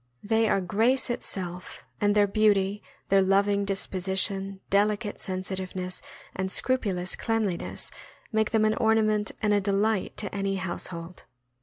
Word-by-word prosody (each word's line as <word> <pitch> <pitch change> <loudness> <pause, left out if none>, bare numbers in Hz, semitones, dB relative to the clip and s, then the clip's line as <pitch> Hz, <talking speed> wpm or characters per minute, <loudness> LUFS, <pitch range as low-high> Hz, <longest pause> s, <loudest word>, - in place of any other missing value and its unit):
* - - -41
They 225 0 +4
are 195 - +2
grace 230 +8 +2
itself, 180 -6 -4 0.2
and 205 0 +3
their 205 -1 +6
beauty, 205 -1 +2 0.3
their 195 0 +5
loving 200 +1 +3
dis 195 -1 -1
position, 195 +1 -2
delicate 205 +1 +1
sensitiveness, 185 -1 -3 0.3
and 190 0 -2
scrupulous 195 -9 +1
cleanliness 220 -6 -1 0.4
make 220 -1 +2
them 220 -1 +3
an 215 - +3
ornament 215 -2 +2
and 210 -1 +3
a 205 - +3
delight 200 +1 0
to 205 - -4
any 195 -1 -1
household. 180 -2 -5
200 Hz, 140 wpm, -27 LUFS, 190-215 Hz, 0.4 s, their